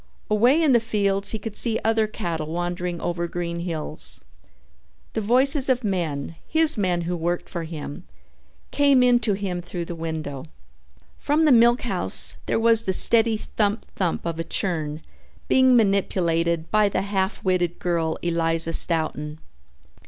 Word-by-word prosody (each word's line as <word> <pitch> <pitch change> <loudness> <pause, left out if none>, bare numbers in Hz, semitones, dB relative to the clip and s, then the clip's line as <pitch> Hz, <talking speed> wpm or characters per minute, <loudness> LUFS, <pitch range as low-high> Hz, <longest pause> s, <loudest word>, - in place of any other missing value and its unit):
Away 240 +8 +4
in 300 - +3
the 240 - +5
fields 200 -3 0
he 220 - -1
could 215 0 -8
see 225 -2 +2
other 220 0 +1
cattle 170 -8 -4
wandering 175 +1 -4
over 170 0 -3
green 170 0 -4
hills. 155 - -1 0.9
The 220 - -2
voices 260 +5 +3
of 255 -1 +1
men, 165 -6 -3
his 320 0 +3
men 180 -4 0
who 175 +1 -3
worked 175 +1 -3
for 170 -2 -5
him, 160 +1 -8 0.7
came 280 -3 +3
in 245 -1 +4
to 215 -3 +1
him 190 -3 -4
through 175 0 -6
the 175 - -6
window. 160 -4 -6 0.7
From 300 +2 +1
the 300 - +4
milkhouse 240 0 +2
there - - 0
was 230 0 +4
the 190 - 0
steady 225 +2 +4
thump, 210 0 -2
thump 180 -4 -2
of 165 -1 -4
a - - -1
churn 160 -4 -3 0.4
being 260 -1 +4
manipulated 170 -6 0
by 215 -1 +3
the 195 - -2
half 195 0 -2
witted 175 -2 0
girl, 165 -2 -1
Eliza 165 -1 +1
Stoughton. 155 -3 +1
185 Hz, 150 wpm, -23 LUFS, 165-225 Hz, 0.9 s, the